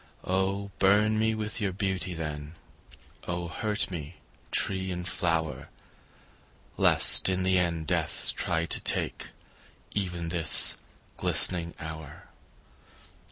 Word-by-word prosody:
Oh 95 +2 -2
burn 105 +3 +3
me 110 0 +1
with 110 +1 -4
your 100 -2 -1
beauty, 95 -2 -3
then, 75 -1 -6 0.7
Oh 85 0 -3
hurt 105 +5 -2
me, 75 -5 -7 0.3
tree 95 -1 0
and 90 -1 -5
flower, 80 -3 -2 1.1
Lest - - +6
in 95 0 -1
the 95 0 +2
end 85 -2 -1
death - - 0
try 85 -2 -1
to - - +2
take - - +1 0.6
Even 90 -4 -3
this 85 -3 +3 0.4
glistening 85 -2 +3
hour. 80 -2 -9
90 Hz, 115 wpm, -27 LUFS, 85-95 Hz, 1.1 s, Lest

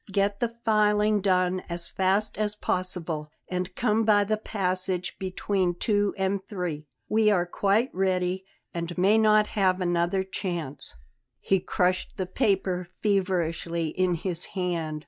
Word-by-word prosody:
Get 200 0 +1
the 230 -1 -1
filing 210 -1 +3
done 185 -1 +2
as 170 0 -2
fast 195 +3 +1
as 210 0 -1
possible, 175 -6 -2 0.2
and 180 0 -3
come 225 -1 +2
by 210 -2 +4
the 215 +2 0
passage 185 -3 -1
between 185 -1 -1
two 205 +1 +1
and 190 0 0
three. 175 -7 -4 0.2
We 215 0 +3
are 180 -4 +3
quite 205 +7 +1
ready 185 0 0 0.3
and 170 +1 -4
may 200 +5 +4
not 215 -1 +5
have 190 -3 +2
another 175 +1 +1
chance." 170 - -4 0.4
He 195 - +2
crushed 180 +1 0
the 185 - -1
paper 185 -4 0 0.2
feverishly 170 -5 0
in 185 +1 +1
his 170 0 -3
hand. 165 -4 -1
185 Hz, 140 wpm, -27 LUFS, 180-205 Hz, 0.4 s, not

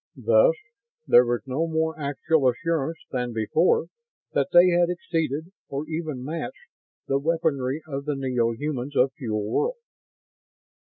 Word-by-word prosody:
Thus - - +5 0.5
there 120 0 +6
was 120 0 -1
no 140 +5 -1
more 160 0 0
actual 145 0 +1
assurance 160 +4 -1
than 125 -2 -2
before 155 - +2 0.5
that - - +1
they 175 +1 +7
had 175 0 +3
exceeded, 165 -2 -2 0.2
or 140 +2 -4
even 155 -5 -4
matched, 170 - -6 0.3
the 135 0 +1
weaponry 150 -3 0
of 140 -2 -5
the 150 -1 -1
neo 125 -4 0
humans 140 +2 -4
of 130 +1 +3
Fuel 110 -6 -2
World. 480 - 0
150 Hz, 140 wpm, -25 LUFS, 130-165 Hz, 0.5 s, they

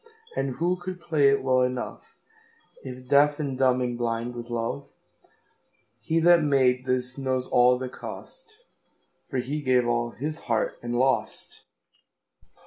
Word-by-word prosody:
And 135 -2 -2
who 175 +3 0
could 180 0 -7
play 155 -5 +3
it 140 -1 +1
well 130 -1 +3
enoughIf 135 - -7
deaf 145 +2 +4
and 140 -3 -2
dumb 130 -1 +3
and 120 -1 -2
blind 115 0 -2
with 120 0 -8
love? 120 +4 -3 1.1
He 160 +8 +1
that 175 0 +6
made 130 -3 +2
this 125 +1 -1
knows 130 -1 -1
all 125 +1 +4
the 130 0 -4
cost, 440 - -10 0.7
For - - -3
he 140 +5 -2
gave 130 -3 +3
all 120 0 0
his 150 +6 -5
heart 115 -2 0
and 120 0 -3
lost. 130 +2 -1
130 Hz, 140 wpm, -26 LUFS, 125-150 Hz, 1.1 s, that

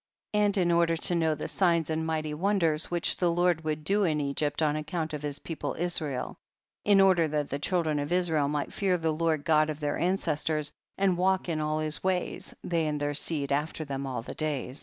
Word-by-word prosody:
8. 210 - +2
And 205 -1 +2
in 175 -2 +2
order 170 -1 +3
to 175 - +1
know 160 -2 +2
the 150 - -5
signs 170 -4 +1
and 160 0 -1
mighty 155 -1 -2
wonders 165 -2 +1
which 175 -1 +1
the 180 - +2
Lord 175 -1 +1
would 155 -1 -2
do 200 +6 +2
in 155 -5 +1
Egypt 145 +2 -1
on 150 -1 +2
account 155 +1 -3
of 150 - -4
his 145 -1 -3
people 165 - -5
Israel, 155 -6 -2 0.5
in 205 -1 +5
order 185 -4 +5
that 150 -1 -2
the 140 - -2
chil 175 +3 +1
dren 155 -2 0
of 145 +2 -4
Israel 165 -5 +2
might 145 0 -2
fear 190 -3 +1
the 160 -2 0
Lord 155 -2 0
God 155 -1 +3
of 155 -1 -4
their 145 -1 -2
ancestors, 155 -4 0 0.2
and 190 -3 +2
walk 190 0 +2
in 160 -3 -1
all 155 0 -1
his 155 0 -1
ways, 185 -1 -1
they 165 -3 0
and 150 -1 -2
their 145 0 -1
seed 145 -1 0
af 150 +3 0
ter 155 - -5
them 140 -1 -4
all 125 -3 -4
the - - -5
days. 145 -3 -3
160 Hz, 225 wpm, -28 LUFS, 150-175 Hz, 0.5 s, in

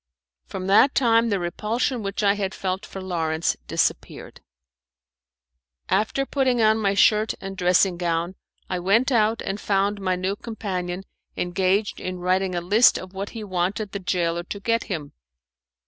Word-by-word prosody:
From 185 -1 -5
that 205 +8 +5
time 230 -2 +3
the 200 - +1
repulsion 220 +8 -2
which 200 +1 -3
I 200 0 +4
had 195 -2 -3
felt 190 +1 -3
for 195 - -8
Lawrence 165 -3 -1
disappeared. - - -2 1.5
After 215 +8 +1
putting 260 -3 +1
on 220 0 +4
my 200 -2 +1
shirt 215 +2 +3
and 195 0 -7
dressing 180 0 +3
gown, 170 0 -1 0.3
I 180 - -2
went 220 +9 +2
out 220 -2 +2
and 200 +2 -4
found 200 0 0
my 185 -1 0
new 185 +2 -2
companion 190 -5 -4 0.3
engaged 190 +3 0
in 185 0 -4
writing 185 +1 0
a 175 - -1
list 210 +7 +5
of 185 0 -9
what 195 +1 -5
he 220 - -5
wanted 195 +2 -2
the 200 - -4
gaoler 175 -2 -1
to 200 - -6
get 230 +3 0
him. 155 -8 -5
195 Hz, 160 wpm, -24 LUFS, 180-215 Hz, 1.5 s, that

